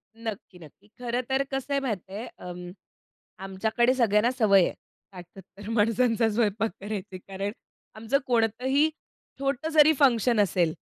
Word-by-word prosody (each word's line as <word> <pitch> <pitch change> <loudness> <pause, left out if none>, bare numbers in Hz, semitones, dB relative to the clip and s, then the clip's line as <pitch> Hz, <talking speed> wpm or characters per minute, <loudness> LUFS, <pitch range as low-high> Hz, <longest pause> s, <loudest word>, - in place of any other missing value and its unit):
नक्की, 220 -5 -7
नक्की. 170 +5 -16
खरं 245 0 -2
तर 265 +1 +2
कसं 270 +1 -3
आहे 280 - +2
माहिती 205 -7 -4
आहे, 220 +5 -5
अम, 180 0 -8 0.7
आमच्याकडे 220 +6 +1
सगळ्यांना 230 -2 +3
सवय 200 -5 +5
आहे, - - -1 0.4
60-70 190 +2 -12
माणसांचा 230 +1 +2
स्वयंपाक 215 0 0
करायची. 200 -2 -6
कारण 195 +2 -5 0.4
आमचं 225 +5 0
कोणतंही 250 +5 +2 0.5
छोटं 275 +2 -2
जरी 310 0 +7
फंक्शन 240 -4 +3
असेल, 180 -5 +2
220 Hz, 135 wpm, -26 LUFS, 195-250 Hz, 0.7 s, जरी